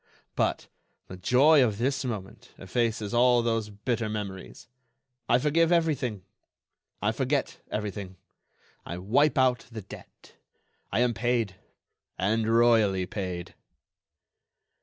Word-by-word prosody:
But - - 0 0.4
the 90 - -7
joy 130 - +5
of 110 -5 0
this 135 +3 0
moment 105 -7 -7
effaces 110 +2 -2
all 120 0 +4
those 115 -2 -1
bitter 110 +2 -2
memories. 100 -3 -6 0.6
I 120 - +5
forgive 160 +5 +2
everything. 145 - 0 0.8
I 105 - +2
forget 130 +4 -2
everything—I 95 -4 -8
wipe 130 +12 +2
out 130 -2 +2
the 110 -3 -7
debt. 100 - -14 0.5
I 115 - +1
am 125 -1 +2
paid—and 110 -1 -3
royally 115 -5 +4
paid." 90 -2 -5
115 Hz, 105 wpm, -27 LUFS, 100-125 Hz, 0.8 s, joy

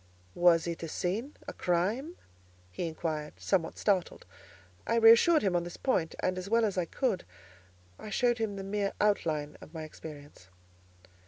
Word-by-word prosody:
"Was 175 -2 +4
it 170 -1 -4
a 165 - -4
sin, 200 - -3
a - - -5
crime?" 210 - -1 0.6
he 130 - -3
inquired, 155 -2 -4
somewhat 175 -4 0
startled. 190 -4 0 0.6
I 230 - +1
reassured 230 +8 +6
him 190 -3 +1
on 175 - +1
this 175 0 -8
point, 175 -12 0
and, 185 0 0
as 185 +2 -7
well 230 +1 +3
as 205 - -1
I 180 -2 0
could, 200 - -1 0.8
I - - -8
showed 240 +3 +1
him 215 -3 -2
the 195 - -5
mere 200 0 -1
outline 155 -8 0
of 160 - -13
my 160 - -5
experience. 145 - -11
185 Hz, 165 wpm, -30 LUFS, 165-220 Hz, 0.8 s, reassured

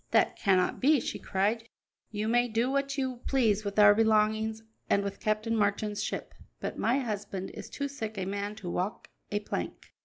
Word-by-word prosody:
"That - - +3
cannot 190 -4 +2
be," 290 +2 +5
she - - -4
cried; 215 +4 0 0.4
"you 210 0 -2
may 240 +2 +3
do 230 +3 0
what 275 +1 0
you 260 -2 -1
please 220 -6 +2
with 200 0 -4
our 205 -1 +8
belongings 220 0 +2 0.3
and 200 - +3
with 200 0 -4
Captain 215 +2 0
Marchand's 210 0 0
ship, - - -4 0.3
but - - -4
my 240 +4 +2
husband 205 -6 -3
is - - -9
too 280 - -3
sick 220 -6 -6
a 190 - -2
man 200 +2 -3
to 205 -4 -8
walk 185 +5 -3 0.2
a 205 0 0
plank. - - -5
215 Hz, 185 wpm, -30 LUFS, 205-235 Hz, 0.4 s, our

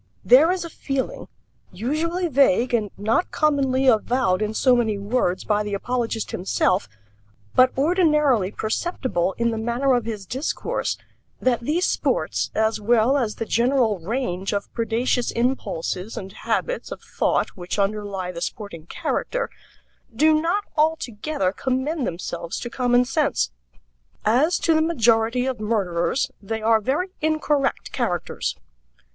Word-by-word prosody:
There 275 +7 +7
is 365 -2 -2
a - - -6
feeling 275 -4 -3 0.4
usually 315 - -1
vague 255 - +3
and 215 -3 +1
not 220 - +1
commonly 275 -4 +1
avowed 235 -4 +2
in 215 0 -1
so 255 +1 +4
many 220 -4 +1
words 200 -3 0
by 210 -1 +1
the 205 -1 -2
apologist 230 0 -2
himself, 185 - 0 0.6
but 255 0 +5
ordinarily 300 - +3
perceptible 215 - -2
in 235 0 +1
the 225 - -3
manner 240 +4 +1
of 240 -3 +1
his 215 -4 -5
discourse 260 - -2 0.4
that 250 -2 +2
these 310 +9 0
sports, - - 0
as 220 0 +1
well 235 +4 +3
as 235 -7 0
the 225 - -4
general 235 -3 +2
range 195 -1 -2
of 200 0 -3
predaceous 235 +1 0
impulses 225 -5 -2
and 190 0 -6
habits - - -2
of - - -7
thought - - 0
which 180 +1 -6
underlie 200 -2 -1
the 170 -1 -7
sporting 175 -7 -6
character, - - -2 0.6
do 310 +6 +5
not 355 +6 0
altogether 300 - 0
commend 260 - -1
themselves 170 -1 -4
to 240 - -5
common 245 -1 +2
sense. 270 - 0 0.7
"As 270 +11 +3
to 330 - +3
the 315 - +3
majority 240 -5 +2
of 260 -4 -2
murderers, 210 +4 0
they 220 +2 -4
are 220 0 +4
very 305 - -1
incorrect 305 -3 0
characters." 180 -10 -2
240 Hz, 140 wpm, -23 LUFS, 210-275 Hz, 0.7 s, There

